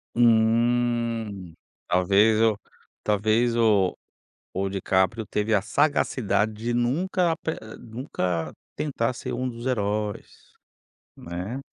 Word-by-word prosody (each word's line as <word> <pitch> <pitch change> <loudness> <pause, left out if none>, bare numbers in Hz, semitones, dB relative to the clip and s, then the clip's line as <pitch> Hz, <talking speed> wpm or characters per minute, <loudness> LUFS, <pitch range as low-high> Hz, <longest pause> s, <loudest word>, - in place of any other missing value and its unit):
Hum. 115 -4 +2 0.3
Talvez 100 +5 +4
eu 110 -2 +3 0.5
talvez 110 +3 +2
o 105 -5 +3 0.6
o 95 +1 -1
DiCaprio 95 +2 +1
teve 105 +2 -1
a 100 - +4
sagacidade 115 -5 +1
de 115 +3 -3
nunca 170 - +1
ape 160 0 -3 0.3
nunca 90 - -3 0.2
tentar 130 -5 -1
ser 120 - -6
um 130 +1 -2
dos 120 0 -7
heróis, 105 -3 -3 0.6
né. 90 +10 -5
110 Hz, 100 wpm, -25 LUFS, 100-120 Hz, 0.6 s, Talvez